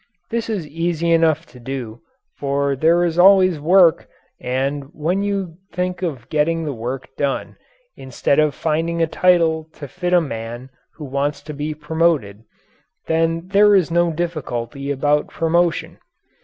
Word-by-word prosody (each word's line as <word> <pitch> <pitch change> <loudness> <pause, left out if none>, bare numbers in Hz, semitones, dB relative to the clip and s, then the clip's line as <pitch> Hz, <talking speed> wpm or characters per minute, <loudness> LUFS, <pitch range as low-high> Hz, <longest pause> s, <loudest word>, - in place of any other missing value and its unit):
This 230 0 -2
is 195 -8 -3
easy 170 +1 -1
enough 165 -1 +3
to 125 - -16
do, 120 -3 -6 0.3
for 140 0 -1
there 165 +5 +3
is 170 0 -1
always 185 -3 +6
work, 170 +1 +4 0.3
and 135 +3 -2
when 175 +6 -1
you 195 -5 -3
think 180 0 -3
of 145 -10 -4
getting 165 +2 +1
the 145 - -3
work 125 +3 -5
done 140 -1 -2 0.4
instead 135 +2 -1
of 155 -2 +2
finding 165 +1 -1
a - - +4
title 160 -2 +2
to 145 - -9
fit 180 +5 -4
a 180 - +6
man 120 -3 -6 0.2
who 150 - -8
wants 140 +2 -2
to 150 - -7
be 150 +1 -4
promoted, 150 -9 0 0.6
then 165 +2 0
there 205 +1 +5
is 180 -4 +2
no 170 0 +2
difficulty 140 -5 -4
about 145 +1 +1
promotion. 170 +1 0
160 Hz, 150 wpm, -20 LUFS, 140-175 Hz, 0.6 s, always